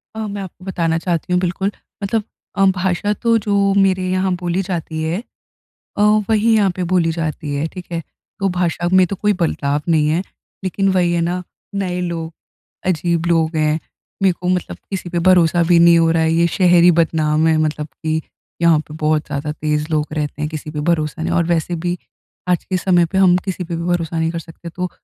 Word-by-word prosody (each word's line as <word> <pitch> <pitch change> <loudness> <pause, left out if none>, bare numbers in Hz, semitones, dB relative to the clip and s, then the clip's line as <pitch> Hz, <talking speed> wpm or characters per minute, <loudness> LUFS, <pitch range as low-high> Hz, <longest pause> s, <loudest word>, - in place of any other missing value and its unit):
अ, 220 -1 -3
मैं 200 0 -5
आपको 185 0 -10
बताना 165 -3 0
चाहती 175 0 -2
हूँ, 180 - +3
बिल्कुल। 190 +3 -1 0.3
मतलब 215 +2 0 0.3
अ, 195 - +4
भाषा 185 +2 0
तो 230 +2 +2
जो 205 -1 +1 0.3
मेरे 185 -1 +1
यहाँ 185 0 +1
बोली 175 +2 0
जाती 165 -3 -3
है 165 +3 -1 0.8
अ, - - +1 0.3
वही 220 +1 +3
यहाँ 200 -3 +3
पे 185 - -2
बोली 170 -3 +3
जाती 155 -3 -3
है, 145 +3 -1
ठीक 180 0 -9
है। 165 -1 -2 0.4
तो 195 - +2
भाषा 175 0 0
में 185 -1 +6
तो 200 - -2
कोई 210 +2 +2
बदलाव 145 -3 0
नहीं 155 -2 +3
है, 165 +4 +1 0.4
लेकिन 195 +1 0
वही 175 -2 +2
है 170 - +1
ना, 175 +2 -1 0.3
नए 180 -2 -2
लोग 165 -2 -4 0.5
अजीब 170 -1 0
लोग 165 -1 +1
हैं, 155 0 +2 0.4
मेरे 190 -2 +5
को 180 - -2
मतलब 180 - -1
किसी 190 -2 -4
पे 175 - -1
भरोसा 175 -2 +4
भी 170 - +6
नहीं 170 0 +6
हो 165 0 +3
रहा 165 0 +2
है। 160 0 +2
ये 170 +1 +3
शहर 175 -3 +5
ही 175 - +7
बदनाम 155 -1 +2
है, 160 - +3
मतलब 150 -1 -1
कि 160 +3 -3 0.4
यहाँ 165 -2 +5
पे 155 0 -11
बहुत 155 0 +1
ज़्यादा 150 +1 -3
तेज़ 150 0 -1
लोग 155 -1 +1
रहते 150 -1 -3
हैं, 150 - 0
किसी 155 -1 -6
पे 150 -1 -4
भरोसा 155 0 -1
नहीं - - -1
और 170 - +2
वैसे 175 0 0
भी, 175 0 0 0.5
आज 180 -2 +1
के 185 - -2
समय 175 -1 +3
पे 190 - +1
हम 180 -2 +5
किसी 185 -2 -3
पे 165 0 -4
भी 170 - -4
भरोसा 170 -2 -1
नहीं 160 0 +1
कर 170 - -4
सकते, 165 0 -10
तो 180 +2 -4
170 Hz, 215 wpm, -19 LUFS, 160-185 Hz, 0.8 s, ही